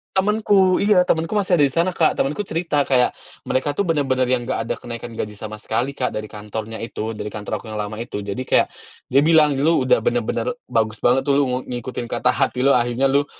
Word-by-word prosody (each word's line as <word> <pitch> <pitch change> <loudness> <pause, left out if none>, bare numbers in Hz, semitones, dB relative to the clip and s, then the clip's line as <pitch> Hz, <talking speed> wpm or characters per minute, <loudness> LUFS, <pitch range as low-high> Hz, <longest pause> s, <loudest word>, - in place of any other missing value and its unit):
Temenku 195 -2 +3
iya, 200 -2 +4
temenku 165 -1 0
masih 195 -4 +2
ada 145 - +5
di 135 - -2
sana 170 +5 +2
Kak. 165 -3 +2
Temenku 150 +10 -1
cerita 160 -5 0
kayak, 125 -2 +2 0.3
mereka 140 +3 0
tuh 145 - -1
bener-bener 135 -8 +1
yang 125 -1 +1
nggak 130 - -2
ada 115 - -2
kenaikan 120 0 -7
gaji 105 - -4
sama 110 +1 -7
sekali 115 +4 -2
Kak, 125 - -1
dari 110 0 -5
kantornya 110 +1 -6
itu 110 -1 -5
dari 105 0 -6
kantor 105 -1 -4
aku - - -13
yang 105 - -2
lama 105 +1 -5
itu. 115 -2 -5
Jadi 100 -1 -5
kayak, - - +3 0.4
dia 140 +3 +4
bilang, 155 -3 +4
"Lu 160 +4 +3
udah - - +3
bener-bener 480 0 0 0.2
bagus 110 -1 0
banget 130 +2 +3
tuh, 140 - +2
lu - - +3
ngu 125 0 -1
ngikutin 125 0 -5
kata 120 +1 0
hati 125 0 0
lu. 135 - +4
Akhirnya 120 +3 +1
lu 140 +1 +2
130 Hz, 220 wpm, -21 LUFS, 115-160 Hz, 0.4 s, ada